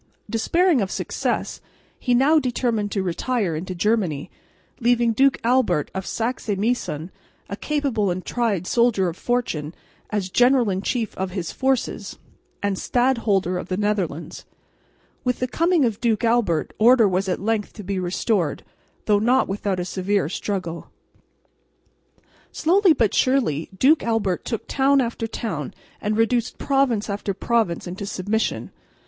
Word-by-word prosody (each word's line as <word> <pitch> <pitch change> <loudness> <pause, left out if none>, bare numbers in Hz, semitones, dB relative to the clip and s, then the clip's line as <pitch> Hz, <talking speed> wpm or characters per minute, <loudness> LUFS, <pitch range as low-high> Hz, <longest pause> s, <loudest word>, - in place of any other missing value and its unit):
Despairing 335 +6 +2
of 195 - -1
success, - - -2 0.4
he 250 -2 +1
now 290 +6 +5
determined 240 -5 -1
to 195 - -1
retire 190 0 -1
into 180 +4 -5
Germany, 175 -6 0 0.5
leaving 235 -1 +3
Duke 270 +4 +3
Albert 240 - +2
of 190 0 -4
Saxe 235 +1 -3
Meissen, 190 -7 -2 0.4
a 200 - -5
capable 265 -6 -1
and 180 +1 -3
tried 220 -7 -1
soldier 230 -5 +2
of 165 - -7
fortune, 175 -11 -2 0.3
as 195 -3 -2
general 245 -2 +4
in 190 0 -2
chief 225 0 -2
of 190 0 -1
his 180 -3 -4
forces 265 -2 -1 0.5
and 200 -2 0
Stadholder 220 -8 +1
of - - -7
the 185 - -2
Netherlands. 195 -6 -2 0.8
With 250 -1 0
the 255 - -1
coming 335 +2 +2
of 220 -3 -2
Duke 230 -3 +1
Albert 225 -9 +1
order 230 0 +6
was 190 +1 0
at 180 - -1
length 215 0 -1
to 210 - -9
be 195 0 -2
restored, 180 -2 -1 0.4
though 205 -1 +3
not 250 +5 +3
without 195 -1 -2
a 175 - -2
severe 190 -2 0
struggle. 180 -3 -4 1.6
Slowly 365 +2 +4
but 230 -7 +1
surely 240 - +1
Duke 295 +9 +4
Albert 210 -6 -1
took 230 - -4
town 275 0 +3
after 230 -2 -1
town 175 - -4 0.3
and 210 +1 -1
reduced 230 +1 +1
province 270 -6 +1
after 200 -1 -3
province 220 -6 0
into 185 +3 -6
submission. 205 +4 -2
215 Hz, 145 wpm, -23 LUFS, 185-245 Hz, 1.6 s, order